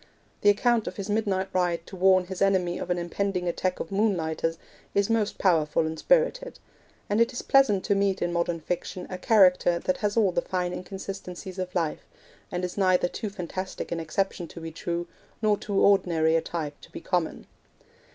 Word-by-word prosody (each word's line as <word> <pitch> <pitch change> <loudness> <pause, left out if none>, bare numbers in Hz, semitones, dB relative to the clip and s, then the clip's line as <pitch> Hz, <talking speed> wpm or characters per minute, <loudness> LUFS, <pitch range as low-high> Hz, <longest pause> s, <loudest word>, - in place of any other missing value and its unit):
The 205 - +5
account 230 +2 +2
of - - -4
his 200 0 -4
midnight 200 -3 0
ride 175 -2 0
to - - -10
warn 185 0 +4
his 190 0 -7
enemy 185 -3 +2
of - - -5
an 180 - +1
impending 180 +1 -2
attack 180 +1 -1
of 165 - -5
Moonlighters 165 -5 0 0.4
is 200 +2 +2
most 220 -2 0
powerful 160 -4 +2
and 160 0 -4
spirited; - - +1 0.5
and 205 +2 +2
it 230 +2 +3
is 245 - -4
pleasant 255 -9 +4
to 205 - +3
meet 195 -1 +1
in 175 0 -1
modern 170 -1 0
fiction 180 +2 -4
a 185 - -5
character 180 -4 +4
that 185 +1 -1
has 210 +1 -1
all 205 -5 +4
the 175 0 0
fine 180 -1 -2
inconsistencies 190 -1 -7
of 185 0 -4
life, 165 -4 -2 0.4
and 180 0 -2
is 180 +3 -5
neither 185 -2 +3
too 210 +4 -5
fantastic 185 -1 -5
an 170 - -1
exception 175 +2 -2
to 170 - -10
be 165 0 -6
true, 170 +1 -3 0.3
nor 215 -2 +3
too 200 -1 -2
ordinary 165 -5 +3
a 165 - +3
type 155 -4 -5
to - - -15
be - - -7
common. 175 -3 -1
185 Hz, 190 wpm, -26 LUFS, 175-200 Hz, 0.5 s, The